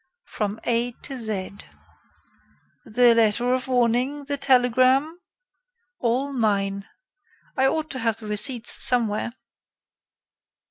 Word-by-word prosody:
"From 210 Hz, 0 st, -4 dB
A 240 Hz, +1 st, -1 dB
to 275 Hz, -, -6 dB
Z." 205 Hz, -5 st, -5 dB, 1.3 s
"The 240 Hz, +2 st, +4 dB
letter 230 Hz, +2 st, +2 dB
of 255 Hz, 0 st, -2 dB
warning? 250 Hz, +3 st, 0 dB
the 285 Hz, 0 st, -1 dB
telegram?" 260 Hz, +4 st, +2 dB, 0.8 s
"All 255 Hz, +4 st, -1 dB
mine. 200 Hz, -4 st, -1 dB, 0.7 s
I 265 Hz, 0 st, +3 dB
ought 315 Hz, +2 st, -2 dB
to 260 Hz, -, -5 dB
have 225 Hz, -2 st, -1 dB
the 220 Hz, -, -9 dB
receipts 225 Hz, +3 st, -2 dB
somewhere." 230 Hz, -2 st, +2 dB
245 Hz, 105 wpm, -23 LUFS, 220-260 Hz, 1.3 s, The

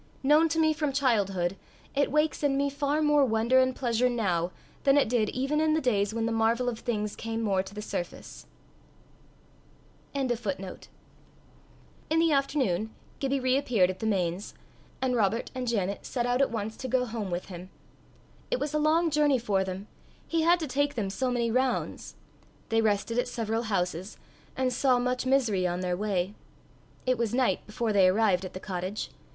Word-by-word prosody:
Known 305 Hz, +4 st, +5 dB
to 320 Hz, -, -1 dB
me 315 Hz, -1 st, +4 dB
from 300 Hz, -2 st, -1 dB
childhood, 195 Hz, -9 st, +1 dB, 0.4 s
it 285 Hz, -1 st, +1 dB
wakes 300 Hz, +1 st, +1 dB
in 280 Hz, -2 st, +2 dB
me 280 Hz, 0 st, +1 dB
far 285 Hz, +2 st, 0 dB
more 295 Hz, -1 st, +4 dB
wonder 235 Hz, +1 st, +3 dB
and 260 Hz, 0 st, +2 dB
pleasure 245 Hz, -1 st, +1 dB
now, 185 Hz, -8 st, 0 dB, 0.3 s
than 275 Hz, 0 st, +5 dB
it 285 Hz, -, +4 dB
did 225 Hz, -2 st, +1 dB
even 275 Hz, +4 st, 0 dB
in 310 Hz, 0 st, +3 dB
the -, -, +2 dB
days 205 Hz, -7 st, +1 dB
when 225 Hz, 0 st, -1 dB
the 230 Hz, -, 0 dB
marvel 225 Hz, +2 st, +1 dB
of 235 Hz, -2 st, -2 dB
things 210 Hz, -4 st, -2 dB
came 225 Hz, 0 st, -3 dB
more 195 Hz, -3 st, +2 dB
to 190 Hz, +2 st, -11 dB
the 210 Hz, -, -5 dB
surface. 175 Hz, -4 st, -6 dB, 1.7 s
In 275 Hz, -1 st, 0 dB
the 195 Hz, -6 st, -3 dB, 1.5 s
afternoon, 265 Hz, -, +1 dB, 0.3 s
Gibbie 275 Hz, 0 st, 0 dB
re 255 Hz, 0 st, +2 dB
appeared 225 Hz, -9 st, +2 dB
at 185 Hz, -, -11 dB
the 220 Hz, -, -2 dB
Mains, 185 Hz, -2 st, -1 dB, 0.5 s
and 255 Hz, -1 st, +1 dB
Robert 220 Hz, 0 st, 0 dB
and 255 Hz, -1 st, -4 dB
Janet 200 Hz, -4 st, -1 dB
set 240 Hz, -2 st, -2 dB
out 245 Hz, +2 st, +1 dB
at 275 Hz, -, +3 dB
once 220 Hz, -1 st, -4 dB
to 260 Hz, -, -5 dB
go 255 Hz, 0 st, +1 dB
home 220 Hz, -4 st, -4 dB
with 175 Hz, +2 st, -4 dB
him. 180 Hz, 0 st, -8 dB, 0.8 s
It -, -, 0 dB
was 295 Hz, -, -3 dB
a 300 Hz, -, +2 dB
long 320 Hz, +2 st, +3 dB
journey 295 Hz, -2 st, +3 dB
for 205 Hz, -5 st, 0 dB
them 190 Hz, +2 st, -6 dB, 0.4 s
he 330 Hz, -1 st, +1 dB
had 345 Hz, +2 st, +4 dB
to 310 Hz, -, -2 dB
take 285 Hz, +2 st, 0 dB
them 200 Hz, -5 st, -2 dB
so 255 Hz, +5 st, -1 dB
many 235 Hz, -2 st, 0 dB
rounds. 255 Hz, +1 st, -1 dB, 0.5 s
They 225 Hz, 0 st, +3 dB
rested 220 Hz, +2 st, +1 dB
at -, -, 0 dB
several 225 Hz, -2 st, -2 dB
houses, 180 Hz, 0 st, -2 dB, 0.4 s
and 260 Hz, -1 st, +1 dB
saw 260 Hz, -3 st, +3 dB
much 250 Hz, +1 st, -1 dB
misery 230 Hz, -9 st, +2 dB
on 175 Hz, +1 st, -2 dB
their 180 Hz, -1 st, -1 dB
way. 195 Hz, -1 st, -1 dB, 0.7 s
It 255 Hz, -2 st, +1 dB
was 235 Hz, -1 st, 0 dB
night 250 Hz, -8 st, +1 dB
before 215 Hz, +1 st, -1 dB
they 195 Hz, -2 st, +6 dB
arrived 195 Hz, -1 st, +3 dB
at 185 Hz, -, -7 dB
the 185 Hz, -, -6 dB
cottage. 185 Hz, +1 st, -4 dB
235 Hz, 185 wpm, -28 LUFS, 200-270 Hz, 1.7 s, they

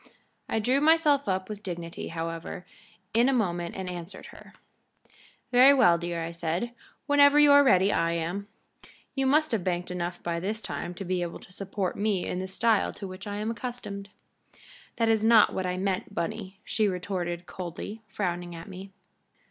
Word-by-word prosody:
I -, -, 0 dB
drew 250 Hz, +6 st, +2 dB
myself 300 Hz, -5 st, +4 dB
up 185 Hz, 0 st, -1 dB
with 210 Hz, -1 st, -7 dB
dignity, 170 Hz, -4 st, -6 dB
however, 165 Hz, +1 st, -5 dB, 0.5 s
in 235 Hz, +4 st, +4 dB
a -, -, +2 dB
moment 175 Hz, -7 st, -1 dB
and 190 Hz, -1 st, -4 dB
answered 180 Hz, +1 st, -7 dB
her. -, -, -14 dB, 1.0 s
"Very 255 Hz, +3 st, +8 dB
well, 175 Hz, -10 st, +5 dB
dear," 170 Hz, -1 st, -3 dB
I 165 Hz, -, -4 dB
said. 170 Hz, +7 st, -2 dB, 0.3 s
"Whenever 285 Hz, 0 st, +6 dB
you 295 Hz, -1 st, +7 dB
are 285 Hz, 0 st, +8 dB
ready 200 Hz, -7 st, +4 dB
I 165 Hz, 0 st, +1 dB
am. 175 Hz, +5 st, -3 dB, 0.7 s
You 270 Hz, -1 st, 0 dB
must 305 Hz, +2 st, +3 dB
have 220 Hz, -6 st, 0 dB
banked 180 Hz, 0 st, -2 dB
enough 175 Hz, 0 st, -4 dB
by 170 Hz, -1 st, -1 dB
this 210 Hz, +5 st, -3 dB
time 180 Hz, -4 st, -5 dB
to 195 Hz, -, -6 dB
be 180 Hz, 0 st, -1 dB
able 170 Hz, -1 st, -4 dB
to -, -, -15 dB
support 195 Hz, -1 st, -3 dB
me 205 Hz, -3 st, 0 dB
in 180 Hz, -, -3 dB
the 190 Hz, -, -3 dB
style 215 Hz, +2 st, +2 dB
to 195 Hz, -, -7 dB
which 185 Hz, +3 st, -9 dB
I 205 Hz, -, -4 dB
am 215 Hz, +2 st, -2 dB
accustomed." 230 Hz, -5 st, -6 dB, 0.9 s
"That 230 Hz, -1 st, +1 dB
is 220 Hz, -1 st, +3 dB
not 225 Hz, -1 st, +6 dB
what 185 Hz, -1 st, -2 dB
I 180 Hz, 0 st, -2 dB
meant, 195 Hz, +1 st, -2 dB
Bunny," 195 Hz, +1 st, -4 dB
she 215 Hz, -2 st, +1 dB
retorted, 180 Hz, -2 st, -3 dB
coldly, 185 Hz, +5 st, -7 dB
frowning 175 Hz, -3 st, -3 dB
at 165 Hz, 0 st, -9 dB
me. 190 Hz, 0 st, -9 dB
190 Hz, 180 wpm, -27 LUFS, 175-225 Hz, 1.0 s, Very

